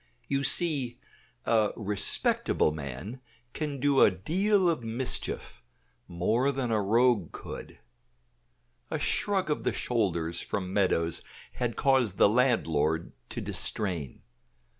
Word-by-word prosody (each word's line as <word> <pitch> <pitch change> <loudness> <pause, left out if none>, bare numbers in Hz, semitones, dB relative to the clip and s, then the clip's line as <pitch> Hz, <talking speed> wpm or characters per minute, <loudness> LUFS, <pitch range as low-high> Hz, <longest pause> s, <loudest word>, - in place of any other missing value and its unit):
You 140 0 0
see, 140 -6 +2 0.5
a 110 -3 +2
respectable 100 -6 +2
man 75 - -7 0.3
can 150 -3 -4
do 140 0 +3
a - - +8
deal 185 - +1
of 165 -8 0
mischief; 115 +3 -3 0.5
more 110 +10 +1
than 130 -3 -2
a 110 -1 +2
rogue 115 -2 +2
could. - - -9 1.1
A - - -2
shrug 190 -5 0
of 150 - -2
the - - 0
shoulders 85 -8 -1
from 95 -2 -4
Meadows 85 -5 +1 0.3
had 120 -2 -3
caused 130 -8 +2
the - - +6
landlord 80 - +1 0.2
to - - -5
distrain. 85 - -2
115 Hz, 120 wpm, -28 LUFS, 90-135 Hz, 1.1 s, a